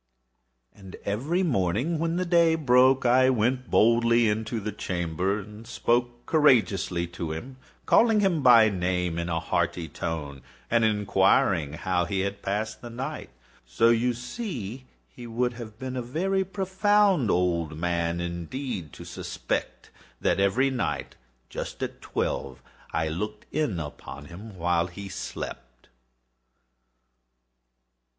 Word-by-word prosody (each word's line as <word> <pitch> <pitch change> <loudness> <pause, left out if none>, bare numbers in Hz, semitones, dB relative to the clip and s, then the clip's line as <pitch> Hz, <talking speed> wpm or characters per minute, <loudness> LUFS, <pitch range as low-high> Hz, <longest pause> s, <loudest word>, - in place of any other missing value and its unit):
And 95 -2 -12
every 140 - 0
morning, 125 - 0
when 165 +1 0
the 185 +1 0
day 170 -2 +4
broke, 130 -3 +4
I 130 +2 +5
went 125 +1 0
boldly 115 +1 +4
into 110 +2 -1
the 105 0 -4
chamber, 90 0 -2
and 105 +2 -11
spoke 120 0 0
courageously 105 - +3
to 85 -2 -5
him, 125 +12 -7 0.3
calling 225 -2 +5
him 190 -6 +2
by 120 -4 +7
name 90 -3 -1
in 85 +1 -3
a 80 -1 0
hearty 85 +1 -1
tone, 75 -3 -5 0.3
and 115 -1 +3
inquiring 95 -7 +2
how 90 +2 0
he 95 +2 -1
has 100 0 -1
passed 105 +3 -3
the 120 - -8
night. 135 +6 -5 0.3
So 65 - +2
you 120 +1 +2
see 125 - -6 0.2
he 120 -1 -11
would 120 +2 -1
have 115 -3 -9
been 130 +1 -5
a 125 - -2
very 185 +10 0
profound 190 - +2
old 85 -4 0
man, 85 0 -1
indeed, 85 - -4
to - - -10
suspect - - -4 0.3
that - - +1
every 120 +8 +2
night, 125 -3 -3 0.3
just - - -6
at - - -5
twelve, 65 -2 -3 0.3
I 80 0 0
looked 105 +7 -4
in 145 - 0
upon 75 -1 -8
him 95 +5 -11
while 85 0 +1
he 100 +3 -9
slept. 65 -8 -7
110 Hz, 135 wpm, -26 LUFS, 90-130 Hz, 0.3 s, by